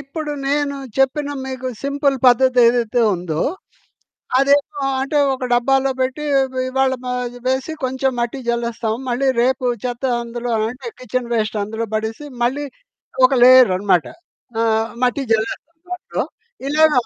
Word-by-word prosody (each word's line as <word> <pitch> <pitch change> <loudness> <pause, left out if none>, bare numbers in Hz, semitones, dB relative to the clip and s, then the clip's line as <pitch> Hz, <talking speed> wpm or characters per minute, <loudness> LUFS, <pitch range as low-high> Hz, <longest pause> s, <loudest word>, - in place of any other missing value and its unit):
ఇప్పుడు 295 +2 -5 0.2
నేను 285 0 0 0.2
చెప్పిన 285 +2 +1 0.2
మీకు 260 -1 -5 0.2
సింపుల్ 280 -1 +1
పద్ధతేదైతే 245 -2 +4
ఉందో, 170 -3 -3 1.0
అదేమో 280 +1 +2 0.2
అంటే 290 +2 0 0.2
ఒక 255 -1 -5
డబ్బాలో 270 +2 +3
పెట్టి 265 +3 -1
ఇ 275 - +5 0.3
ఇవ్వాళ 265 0 +1
మ 250 - -4 0.4
వేసి 260 +4 0
కొంచెం 260 +1 0
మట్టి 240 +3 -2
జల్లేస్తాం. 235 -2 -1
మళ్ళీ 260 +3 +1
రేపు 255 0 +1 0.2
చెత్త 245 +1 -4 0.2
అందులో 240 +1 -5 0.2
అంటే 250 0 -8
కిచెన్ 255 -1 -3
వేస్ట్ 215 -1 -1
అందులో 220 +3 -3
పడేసి, 220 +6 -3 0.2
మళ్ళీ 280 +4 -1 0.6
ఒక 265 - -1
లేయర్ 255 -2 +8
అనమాట. 185 -4 +2 0.6
ఆహ్, 225 0 +1 0.2
మట్టి 250 +3 0
జల్లేస్తాం 230 +9 -2
దాంట్లో. 360 -1 -3 0.4
ఇలాగ 310 +1 +4
255 Hz, 130 wpm, -19 LUFS, 235-275 Hz, 1.0 s, లేయర్